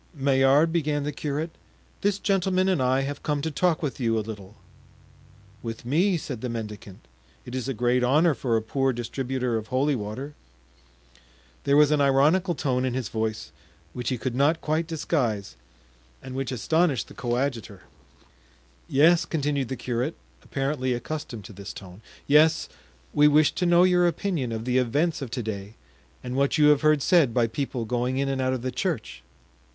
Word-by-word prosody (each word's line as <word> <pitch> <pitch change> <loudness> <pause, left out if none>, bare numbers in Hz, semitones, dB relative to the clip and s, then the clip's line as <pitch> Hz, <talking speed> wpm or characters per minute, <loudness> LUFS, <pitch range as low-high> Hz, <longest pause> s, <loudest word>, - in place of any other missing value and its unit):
"Maillard," 140 +3 +3
began 150 -3 0
the 150 - -2
curate, 150 +3 -3 0.5
"this 200 -1 +1
gentleman 190 -2 +1
and 185 -7 +1
I 130 +1 +2
have 140 +1 -4
come 150 -1 -1
to 160 - -2
talk 170 +1 +1
with 140 -2 -3
you 115 -3 +1
a 110 - -2
little." 105 -2 -9 1.1
"With 115 0 -7
me!" 175 +9 +2
said 130 -7 -6
the 125 - -3
mendicant; 105 - -7 0.4
"it 125 - -9
is 130 -1 -3
a 135 - -1
great 125 +2 +1
honor 150 +6 +4
for 120 -4 0
a 110 - -2
poor 135 +3 0
distributor 125 0 -2
of 110 0 -6
holy 135 +4 +1
water." 125 +6 -5 1.3
There 140 +1 +4
was 150 0 +5
an 150 -1 +3
ironical 150 +7 +3
tone 130 -2 0
in 130 -1 -1
his 130 -5 -3
voice 110 -1 -3 0.4
which 125 -1 -3
he 130 - -1
could 125 +1 -3
not 145 +6 +2
quite 155 +2 -1
disguise 130 - -2 0.6
and 130 - -9
which 135 0 -3
astonished 145 +2 +1
the - - -13
coadjutor. 120 -5 -3 1.1
"Yes," 165 +5 +5
continued 145 -5 -1
the 130 - -4
curate, 125 +5 -2 0.3
apparently 135 -2 -2
accustomed 120 -3 -5
to 110 - -10
this 100 +1 -8
tone, 95 +1 -11 0.2
"yes, 155 +2 +4 0.4
we 150 - +5
wish 150 +1 +4
to 180 - -1
know 175 +1 +5
your 180 -1 +4
opinion 170 -8 -2
of 110 0 -4
the 125 0 +2
events 145 +7 0
of 135 - -5
to 120 0 -4
day 105 0 -6 0.5
and 125 0 -5
what 140 +3 +1
you 150 -1 +6
have 150 -2 +4
heard 155 -3 +3
said 155 -10 +3
by 120 -2 +4
people 120 0 -3
going 125 +3 -1
in 135 0 0
and 135 -1 -1
out 130 0 +1
of 125 -2 -4
the 130 - -2
church." 120 - -3
135 Hz, 180 wpm, -25 LUFS, 120-150 Hz, 1.3 s, you